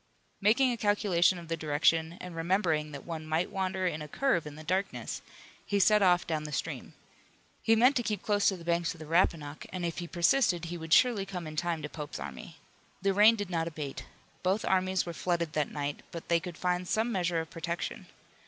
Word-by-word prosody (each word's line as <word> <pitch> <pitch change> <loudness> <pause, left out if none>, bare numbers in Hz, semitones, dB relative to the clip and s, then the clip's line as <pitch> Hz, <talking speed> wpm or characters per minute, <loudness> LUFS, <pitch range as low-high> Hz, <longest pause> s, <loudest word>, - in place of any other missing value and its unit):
Making 245 +6 +4
a 240 - -2
calculation 205 -4 +3
of 170 -1 -9
the 165 - -1
direction 160 +2 +1
and 180 -2 -8
remembering 165 -3 0
that 140 -2 -8
one 165 -2 -5
might 160 +4 -1
wander 190 -1 -1
in 160 -4 -1
a 150 - -6
curve 175 - 0
in 145 - -8
the 155 - -10
darkness, 190 +5 -2 0.4
he 205 - 0
set 210 +2 +5
off 180 -2 +4
down 155 -2 -2
the 150 - -6
stream. - - -4 0.7
He 225 - +4
meant 250 +5 +5
to - - +2
keep 210 -4 -3
close 205 -1 +2
to 190 - +2
the 170 - -12
banks 170 0 0
of - - -15
the 155 - -8
Rappahannock, 155 -3 0
and 180 -2 -3
if 170 +1 -3
he 175 - -5
persisted 175 0 +2
he 175 +1 -5
would 160 0 -8
surely 230 0 +5
come 180 -3 -5
in 155 0 -7
time 165 -1 -1
to - - -2
Pope's 150 -1 -7
army. 70 -2 -8 0.5
The 195 0 +3
rain 210 +3 +7
did 205 -4 -5
not 165 -1 0
abate. 150 -4 -6 0.4
Both 190 +3 0
armies 185 0 +1
were 170 - -5
flooded 170 -2 -1
that 150 -2 0
night, 145 -1 -3
but 170 - -8
they 170 0 +4
could 175 -1 -8
find 180 0 -1
some 225 +5 +1
measure 175 -4 0
of 160 0 -6
protection. 170 0 -4
175 Hz, 220 wpm, -30 LUFS, 160-195 Hz, 0.7 s, rain